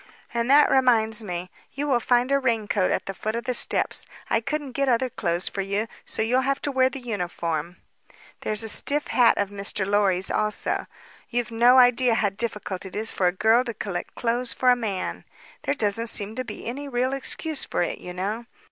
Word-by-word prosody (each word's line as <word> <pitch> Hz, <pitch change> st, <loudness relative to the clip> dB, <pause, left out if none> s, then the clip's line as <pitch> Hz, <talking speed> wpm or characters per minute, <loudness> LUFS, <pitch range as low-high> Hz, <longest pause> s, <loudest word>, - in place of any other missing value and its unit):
And 235 Hz, +1 st, -1 dB
that 290 Hz, +2 st, +6 dB
reminds 230 Hz, -4 st, +3 dB
me: 180 Hz, -2 st, -5 dB, 0.2 s
you 285 Hz, +2 st, -3 dB
will 265 Hz, -4 st, +2 dB
find 245 Hz, +2 st, +2 dB
a 275 Hz, -, +4 dB
raincoat 220 Hz, -6 st, +1 dB
at -, -, -1 dB
the 195 Hz, -, -4 dB
foot 215 Hz, +3 st, -3 dB
of 235 Hz, -, -3 dB
the 250 Hz, -, -1 dB
steps. -, -, +1 dB, 0.2 s
I 225 Hz, -, +3 dB
couldn't 295 Hz, +2 st, -3 dB
get 275 Hz, +2 st, 0 dB
other 250 Hz, +1 st, +1 dB
clothes 175 Hz, -3 st, -1 dB
for 200 Hz, -, -3 dB
you, 200 Hz, +3 st, -1 dB, 0.2 s
so -, -, -1 dB
you'll 250 Hz, +4 st, +2 dB
have 275 Hz, +1 st, 0 dB
to 285 Hz, -, -1 dB
wear 260 Hz, -1 st, +3 dB
the 265 Hz, -, -7 dB
uniform. 175 Hz, -, -3 dB, 0.6 s
There's 215 Hz, +1 st, 0 dB
a -, -, -4 dB
stiff 290 Hz, +7 st, +2 dB
hat 240 Hz, -2 st, +4 dB
of 200 Hz, -1 st, -1 dB
Mr. 200 Hz, -1 st, -2 dB
Lorry's 195 Hz, -2 st, +1 dB
also. 215 Hz, 0 st, -1 dB, 0.4 s
You've 240 Hz, -1 st, -1 dB
no 240 Hz, +3 st, +5 dB
idea 245 Hz, -1 st, +5 dB
how 210 Hz, -3 st, +2 dB
difficult 200 Hz, -2 st, -4 dB
it 190 Hz, -, -9 dB
is 220 Hz, +2 st, 0 dB
for 185 Hz, -, +1 dB
a -, -, +3 dB
girl 220 Hz, +6 st, +3 dB
to 235 Hz, -3 st, -5 dB
collect 190 Hz, -4 st, -5 dB
clothes 240 Hz, +1 st, 0 dB
for 255 Hz, -1 st, +3 dB
a -, -, +5 dB
man. 210 Hz, -6 st, -3 dB, 0.4 s
There 285 Hz, -, +1 dB
doesn't 225 Hz, -1 st, 0 dB
seem 215 Hz, -1 st, 0 dB
to 255 Hz, -, -2 dB
be -, -, -8 dB
any 275 Hz, +5 st, -5 dB
real 255 Hz, +1 st, 0 dB
excuse 290 Hz, +2 st, -2 dB
for -, -, -1 dB
it, -, -, -3 dB
you 180 Hz, -, -8 dB
know. 205 Hz, +6 st, -4 dB
230 Hz, 210 wpm, -24 LUFS, 200-255 Hz, 0.6 s, that